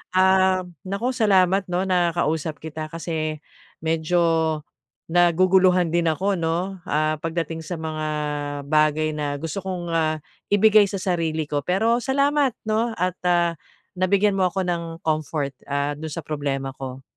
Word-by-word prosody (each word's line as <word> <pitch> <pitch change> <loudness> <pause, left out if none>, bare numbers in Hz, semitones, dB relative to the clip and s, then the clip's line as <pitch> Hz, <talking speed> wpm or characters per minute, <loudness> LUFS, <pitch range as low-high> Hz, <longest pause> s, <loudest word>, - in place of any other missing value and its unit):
um, 185 -1 +3 0.2
naku, 200 +6 -1
salamat 195 -5 +3
'no, 180 +1 0
nakausap 170 -4 0
kita 155 0 -6
kasi 155 -2 -4 0.4
medyo 160 +2 +1 0.9
naguguluhan 180 0 +4
din 170 0 +1
ako, 190 +4 0
'no, 175 +4 -2
ah, 155 0 0
pagdating 165 0 -3
sa 175 - -4
mga 155 -1 -4 0.7
bagay 155 0 +3
na 150 -2 -3
gusto 165 +6 -4
kong, 180 -3 -4
ah, 160 -1 +1 0.3
ibigay 205 0 +5
sa 200 - -5
sarili 165 -4 0
ko. 145 -1 -2
Pero 220 +6 +2
salamat, 280 0 +1
'no 220 +1 0
at, 180 -1 -2
ah, 175 -1 +3 0.5
nabigyan 195 +2 +3
mo 185 - +4
ako 190 +1 -2
ng 175 -2 -1 0.2
comfort, 155 -2 -1 0.2
ah, 140 0 0
dun 160 - -5
sa 165 - -5
problema 140 -2 -3
ko. 130 0 -7
175 Hz, 140 wpm, -23 LUFS, 155-190 Hz, 0.9 s, ibigay